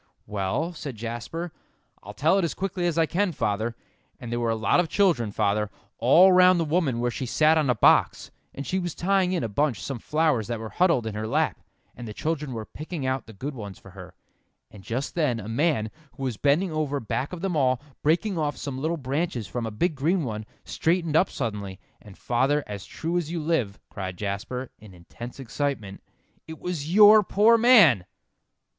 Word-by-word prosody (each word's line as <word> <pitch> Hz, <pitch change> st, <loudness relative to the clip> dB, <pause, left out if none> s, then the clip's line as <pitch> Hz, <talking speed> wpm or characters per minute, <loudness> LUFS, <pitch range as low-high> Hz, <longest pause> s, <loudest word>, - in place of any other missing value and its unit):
"Well," 105 Hz, -, -2 dB
said 145 Hz, -6 st, -7 dB
Jasper, 120 Hz, +10 st, -5 dB, 0.5 s
"I'll 105 Hz, +2 st, -10 dB
tell 160 Hz, -, +3 dB
it -, -, 0 dB
as 170 Hz, -, -2 dB
quickly 185 Hz, -2 st, -2 dB
as 170 Hz, -2 st, -1 dB
I 165 Hz, -, +4 dB
can, 190 Hz, +4 st, 0 dB
father. 110 Hz, -1 st, -1 dB, 0.4 s
And 120 Hz, -, -7 dB
there 120 Hz, -, -1 dB
were 120 Hz, -1 st, 0 dB
a 115 Hz, -, +1 dB
lot 110 Hz, +9 st, +2 dB
of 175 Hz, -2 st, +1 dB
children, 160 Hz, -, +2 dB
father, 105 Hz, 0 st, 0 dB, 0.3 s
all 170 Hz, +11 st, +6 dB
round 180 Hz, 0 st, +6 dB
the 165 Hz, -, +1 dB
woman 150 Hz, -6 st, 0 dB
where 120 Hz, 0 st, 0 dB
she 130 Hz, +2 st, -4 dB
sat 155 Hz, +5 st, +4 dB
on 155 Hz, -4 st, +1 dB
a 125 Hz, -, +3 dB
box, -, -, +3 dB, 0.2 s
and 140 Hz, -, -7 dB
she 190 Hz, -, -1 dB
was 175 Hz, -3 st, -4 dB
tying 190 Hz, 0 st, +1 dB
in 180 Hz, -8 st, -1 dB
a -, -, -1 dB
bunch 120 Hz, +1 st, 0 dB
some 130 Hz, +6 st, -5 dB
flowers 150 Hz, -6 st, +1 dB
that 120 Hz, -1 st, -3 dB
were 110 Hz, 0 st, -6 dB
huddled 165 Hz, -10 st, +2 dB
in 110 Hz, -, -4 dB
her 110 Hz, +1 st, -4 dB
lap, 155 Hz, +6 st, 0 dB, 0.4 s
and 120 Hz, -, -8 dB
the 105 Hz, -, -8 dB
children 150 Hz, -3 st, -2 dB
were 110 Hz, -3 st, -5 dB
picking 155 Hz, +1 st, -6 dB
out 130 Hz, -2 st, -2 dB
the -, -, -10 dB
good 135 Hz, +9 st, -5 dB
ones 105 Hz, -6 st, -8 dB
for 95 Hz, -, -15 dB
her; 90 Hz, -1 st, -12 dB, 0.6 s
and 100 Hz, -, -13 dB
just 120 Hz, +8 st, -3 dB
then 145 Hz, -9 st, 0 dB
a 105 Hz, -, -8 dB
man, 115 Hz, -2 st, 0 dB, 0.2 s
who 135 Hz, -, -8 dB
was 130 Hz, -4 st, -2 dB
bending 150 Hz, -, +1 dB
over 150 Hz, -2 st, -1 dB
back 130 Hz, +4 st, -3 dB
of 180 Hz, -2 st, -7 dB
them 190 Hz, -3 st, -1 dB
all, 130 Hz, -4 st, +2 dB, 0.2 s
breaking 170 Hz, +4 st, +1 dB
off 150 Hz, -1 st, -1 dB
some 135 Hz, -2 st, -5 dB
little 165 Hz, +3 st, -1 dB
branches 135 Hz, -3 st, -2 dB
from 115 Hz, +4 st, -4 dB
a -, -, -2 dB
big 160 Hz, -, 0 dB
green 160 Hz, +5 st, 0 dB
one, 110 Hz, -4 st, -5 dB, 0.2 s
straightened 165 Hz, -2 st, 0 dB
up 180 Hz, +4 st, +4 dB
suddenly, 100 Hz, -6 st, -4 dB, 0.2 s
and, 105 Hz, -3 st, -14 dB
father, 135 Hz, +5 st, +1 dB
as 100 Hz, -2 st, -7 dB
true 170 Hz, +2 st, -3 dB
as 160 Hz, -3 st, -5 dB
you 170 Hz, -, -2 dB
live," 150 Hz, -11 st, -1 dB
cried 95 Hz, -2 st, -5 dB
Jasper, 105 Hz, +6 st, -4 dB
in 105 Hz, -3 st, -14 dB
intense 120 Hz, +9 st, -10 dB
excitement, 130 Hz, -6 st, -3 dB, 0.5 s
"it 160 Hz, 0 st, -8 dB
was 165 Hz, -4 st, -4 dB
your 210 Hz, +2 st, +8 dB
poor 210 Hz, +4 st, +4 dB
man!" 210 Hz, -, +6 dB
140 Hz, 205 wpm, -25 LUFS, 110-170 Hz, 0.6 s, your